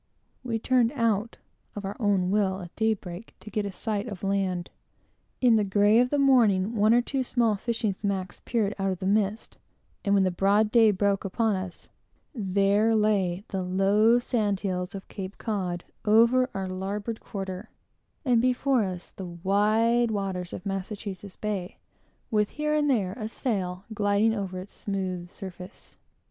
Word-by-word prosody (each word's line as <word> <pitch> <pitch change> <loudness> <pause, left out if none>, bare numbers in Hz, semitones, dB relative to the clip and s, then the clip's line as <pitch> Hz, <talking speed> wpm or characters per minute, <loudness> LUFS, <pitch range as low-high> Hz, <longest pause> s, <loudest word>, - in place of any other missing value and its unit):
We 235 -3 -1
turned 240 0 +2
out, 230 -4 0 0.4
of 205 -1 -5
our 195 +1 -4
own 195 -5 +2
will, 195 -2 +1
at 175 -1 -10
daybreak, 215 -3 -2
to 215 - -11
get 210 -1 -1
a - - -5
sight 210 +2 -3
of 200 -5 -7
land. 190 -3 -1 0.7
In 240 -3 +5
the 210 - +2
grey 205 +3 +4
of 250 0 +3
the 290 - +1
morning, 230 -7 +4
one 215 0 +4
or 240 +1 +5
two 270 +1 -1
small 235 -4 +1
fishing 225 0 -1
smacks 190 -2 -3
peered 215 -4 0
out 195 0 +1
of 185 - -2
the 185 - -5
mist; 205 +2 0 0.4
and 200 0 +2
when 195 - +4
the 185 - +2
broad 200 +4 +2
day 225 -2 +6
broke 200 0 +1
upon 215 +2 0
us, 185 -2 -6 0.5
there 200 0 +2
lay 200 -4 +1
the 190 -2 -2
low 195 +5 +3
sand 215 -5 0
hills 180 -1 -3
of 195 - -8
Cape 195 -1 -7
Cod, 185 -6 -3 0.2
over 235 +4 +4
our 190 -1 -2
larboard 200 +4 -4
quarter, 195 +1 -6 0.6
and 245 -3 +4
before 255 +1 +2
us, 185 -2 -5
the 190 - -7
wide 210 +7 +2
waters 190 -4 -3
of - - -7
Massachusetts 195 0 -5
Bay, 200 -4 -4 0.5
with 210 -2 +2
here 300 0 -2
and 300 -1 +2
there 200 -8 +1
a 215 - -3
sail 195 -6 -3
gliding 205 +1 +2
over 195 -4 -4
its 190 +2 -10
smooth 185 -3 -3
surface. 185 -1 -10
205 Hz, 165 wpm, -27 LUFS, 190-225 Hz, 0.7 s, day